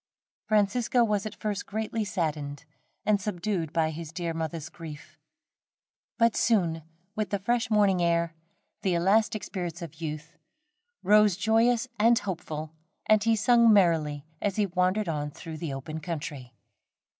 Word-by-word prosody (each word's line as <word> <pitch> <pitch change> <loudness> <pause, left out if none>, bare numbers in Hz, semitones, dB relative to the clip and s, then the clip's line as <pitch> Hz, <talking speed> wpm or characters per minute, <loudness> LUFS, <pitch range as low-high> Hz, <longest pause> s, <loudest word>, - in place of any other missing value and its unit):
Francisco 220 +3 +2
was 210 -2 0
at 215 - -8
first 205 -2 -3
greatly 220 +1 -2
saddened 150 -7 -3 0.4
and 205 -2 +2
subdued 185 -4 -2
by 160 -1 +1
his 160 0 -7
dear 170 0 -3
mother's 160 -1 -4
grief; 155 -2 -11 1.0
but 230 -1 +3
soon 175 -8 +2 0.3
with 215 -1 -2
the 200 - 0
fresh 235 +4 0
morning 200 -4 +3
air, 170 -1 +1 0.5
the 185 -3 +1
elastic 210 +5 +2
spirits 175 -4 -5
of 165 0 -10
youth, 155 +1 -6 0.6
rose 210 -2 +5
joyous 225 +4 +2
and 230 +2 +5
hopeful, 160 -7 -4 0.3
and 215 0 +4
he 225 0 +4
sung 235 +1 +5
merrily 160 -7 +3 0.2
as 200 -2 0
he 210 - +2
wandered 185 +2 0
on 150 -2 -2
through 160 +2 -8
the 155 -2 -4
open 135 +4 -5
country. 145 -6 -6
180 Hz, 145 wpm, -28 LUFS, 160-215 Hz, 1.0 s, rose